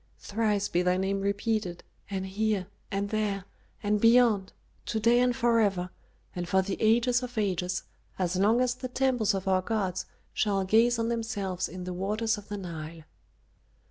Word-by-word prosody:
Thrice 210 -1 0
be 175 - +1
thy 180 0 +2
name 195 +1 0
repeated 200 -2 -1 0.3
and 190 -1 -3
here 205 0 0 0.2
and 200 0 -2
there 205 -3 -1 0.4
and 210 0 +1
beyond, 230 -5 +5 0.4
to 220 - -1
day 235 +2 +4
and 250 -1 +3
forever, 215 -8 +2 0.4
and 175 -1 -4
for 190 0 +3
the 195 0 -2
ages 240 +3 +3
of 250 -1 -7
ages, 185 -3 -1 0.3
as 185 -1 0
long 210 +6 +3
as 250 -1 +2
the 255 +1 -6
temples 250 -5 +1
of 195 0 -4
our 185 -1 +3
gods 190 -3 -2 0.3
shall 200 -2 +1
gaze 230 +5 +4
on 230 0 0
themselves 205 -6 -2
in 180 +1 -7
the 180 0 -4
waters 215 +4 0
of 205 -1 -11
the 205 - -4
Nile." 165 -3 -7
205 Hz, 170 wpm, -28 LUFS, 190-230 Hz, 0.4 s, beyond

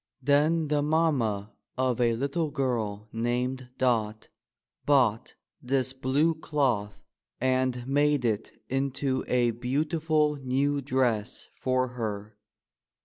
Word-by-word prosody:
Then 150 +3 +3
the 150 -1 +2
mamma 140 -10 +1 0.3
of 130 -2 +1
a 115 -1 +3
little 140 +6 -1
girl 115 -7 -2
named 125 +2 -2
Dot, 110 -4 0 0.5
bought 125 -6 +2 0.3
this 130 0 0
blue 135 +5 +1
cloth 135 -10 -1 0.4
and 130 -1 0
made 145 0 +2
it 110 -2 -2
into 135 0 -1
a 120 -1 +2
beautiful 150 +5 0
new 140 +2 0
dress 125 -4 -1
for 130 0 0
her. 110 -3 -5
130 Hz, 105 wpm, -28 LUFS, 120-145 Hz, 0.5 s, Then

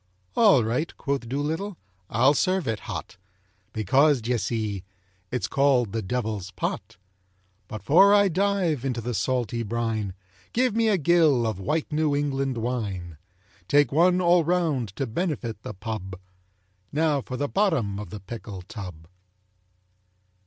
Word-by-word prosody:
"All 205 - +6
right," 125 +9 -1
quoth 140 -4 -2
Doolittle, 160 +8 -2 0.3
"I'll 130 +6 +4
serve 185 +2 +1
it 110 -2 -1
hot, 100 +3 -6 0.5
Because, 135 +6 +3
d'ye 120 +2 -1
see, 105 -4 -2 0.5
it's 125 -1 -1
called 135 -6 +2
The 115 - -2
Devil's 105 -2 -3
Pot. - - -4 0.7
But 110 -3 -7
'fore 185 - +6
I 205 -1 +6
dive 185 -6 +1
into 125 -3 -1
the 120 +2 -3
salty 120 +2 -1
brine, 110 -3 -2 0.4
Give 250 -2 +2
me 230 0 +3
a 205 - +3
gill 160 -7 +4
of 110 -4 -2
white 150 +13 -1
New 150 -1 +1
England 135 -3 -1
wine! 100 -9 -3 0.5
Take 145 +4 +4
one 180 +5 +4
all 175 -1 +4
round 160 - 0
to 135 - -1
benefit 125 - -3
the - - -7
pub. 95 -2 -6 0.7
Now 150 -2 +1
for 130 0 -6
the 145 - -1
bottom 140 - 0
of 105 -4 -7
the 105 +3 -8
pickle 100 -2 -8
tub." 90 -6 -9
125 Hz, 145 wpm, -25 LUFS, 110-160 Hz, 0.7 s, All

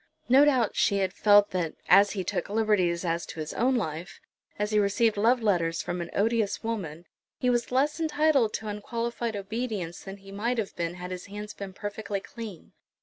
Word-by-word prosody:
No 270 +4 +7
doubt 255 -7 +2
she 200 - +2
had 190 -1 0
felt 205 -1 +5
that 175 -4 -2
as 200 0 +6
he 195 -3 -2
took 175 - -3
liberties 200 -5 +1
as 170 0 0
to - - -8
his 155 0 -4
own 255 +2 +2
life, 170 -4 -4 0.4
as 210 +1 -1
he 210 - +3
received 210 +2 +2
love 230 +4 +3
letters 170 -5 +1
from 175 0 -3
an 170 - -5
odious 220 0 +1
woman, 175 -8 -4 0.3
he 250 - +1
was 240 0 0
less 285 +5 +1
entitled 305 -7 +2
to 220 - -5
unqualified 230 +2 -3
obedience 205 -4 -4
than 195 0 -9
he 195 0 -14
might 230 +5 -1
have 215 -4 -3
been 170 0 -3
had 180 0 -7
his 180 +1 -6
hands 210 +1 -7
been 195 -1 -8
perfectly 205 0 -4
clean. 215 - -9
205 Hz, 195 wpm, -27 LUFS, 185-230 Hz, 0.4 s, No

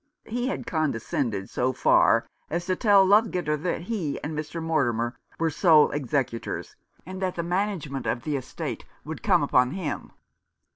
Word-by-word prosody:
He 245 +3 -2
had 265 - -3
condescended 120 - -1
so 130 +1 0
far - - +4 0.2
as 170 +2 -2
to 185 0 0
tell 200 -1 +5
Ludgater 185 -6 +3
that 175 -1 -1
he 175 -6 -3
and 155 +1 -4
Mr. 155 +2 -4
Mortimer 120 -8 0 0.2
were 165 -1 0
sole 155 -2 +5
executors, 135 -4 -2 0.3
and 185 +2 -7
that 185 -1 -1
the 170 - -2
management 175 -7 -2
of 120 - -1
the 150 - -1
estate 130 - -5 0.2
would - - -6
come - - +3
upon 125 - +3
him. 155 -1 -4
160 Hz, 155 wpm, -26 LUFS, 135-185 Hz, 0.3 s, tell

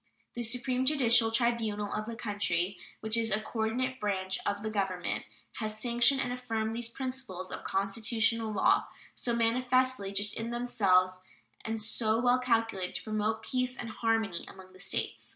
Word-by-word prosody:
The 240 - -4
supreme 250 +2 0
judicial 245 -5 +4
tribunal 225 -3 0
of 215 0 -3
the 230 - -5
country, 200 -4 -1 0.2
which 220 +1 +1
is 230 -1 +1
a 210 +1 +1
coordinate 235 +4 -2
branch 190 -2 -1
of 205 0 -1
the 220 - -2
Government, 190 -4 -2 0.3
has 215 -1 -3
sanctioned 240 +3 +4
and 245 -1 -1
affirmed 225 -3 -2
these 235 0 0
principles 255 -8 -5
of - - -6
constitutional 225 +3 +1
law, 205 - +3 0.3
so 235 -1 -1
manifestly 250 -2 +2
just 205 +1 0
in 225 +1 -4
themselves 190 -7 +2 0.4
and 225 0 -3
so 220 +1 0
well 245 +1 +4
calculated 225 -7 0
to - - -3
promote 215 0 -1
peace 255 0 -1
and 230 -2 -5
harmony 225 -6 0
among 185 -1 -13
the 185 - -15
States. - - -2
225 Hz, 160 wpm, -30 LUFS, 205-240 Hz, 0.4 s, judicial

